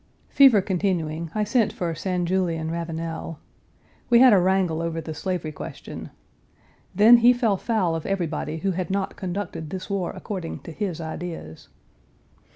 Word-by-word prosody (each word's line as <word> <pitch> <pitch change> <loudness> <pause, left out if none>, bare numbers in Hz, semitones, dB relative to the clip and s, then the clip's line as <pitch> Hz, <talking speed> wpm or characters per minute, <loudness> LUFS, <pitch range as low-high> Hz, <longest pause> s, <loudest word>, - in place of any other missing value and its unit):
Fever 265 -7 +6
continuing, 170 -4 -1
I 215 - +1
sent 225 +1 +2
for 170 -2 -3
St. 180 +1 -2
Julien 170 -3 0
Ravenel. 165 -1 -4 0.7
We 240 - +6
had 250 -1 +8
a 195 - +6
wrangle 180 -3 +1
over 165 -1 -2
the 160 0 -6
slavery 175 -1 -3
question. - - -8 0.9
Then, 220 +5 +8
he 240 +1 +6
fell 235 -5 +1
foul 190 -5 0
of 165 - -5
everybody 170 -4 -2
who 195 +4 -1
had 185 +1 -3
not 195 0 -2
conducted 185 -4 -5
this 185 +3 -6
war 190 -3 -1
according 185 -5 -6
to - - -9
his 175 -1 -3
ideas. 160 - -7
180 Hz, 155 wpm, -24 LUFS, 165-200 Hz, 0.9 s, had